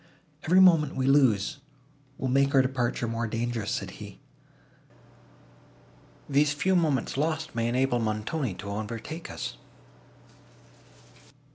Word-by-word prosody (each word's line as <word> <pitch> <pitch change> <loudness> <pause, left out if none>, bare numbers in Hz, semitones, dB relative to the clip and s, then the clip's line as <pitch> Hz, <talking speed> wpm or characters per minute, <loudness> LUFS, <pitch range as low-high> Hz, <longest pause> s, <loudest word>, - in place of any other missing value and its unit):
"Every 180 +4 +3
moment 165 -6 +5
we 130 - -1
lose, 135 -2 +3 0.6
will 130 - -3
make 140 +2 +2
our 135 - +6
departure 125 -2 -1
more 115 0 -2
dangerous," 115 -1 -3
said - - -3
he: - - -9 2.1
"these 145 +1 +2
few 185 +6 +1
moments 155 -7 0
lost 155 +1 -1
may 115 0 -1
enable 125 +1 +1
Montoni 110 - -2
to 100 +3 -7
overtake 115 +10 -6
us." - - -6
130 Hz, 115 wpm, -27 LUFS, 115-150 Hz, 2.1 s, our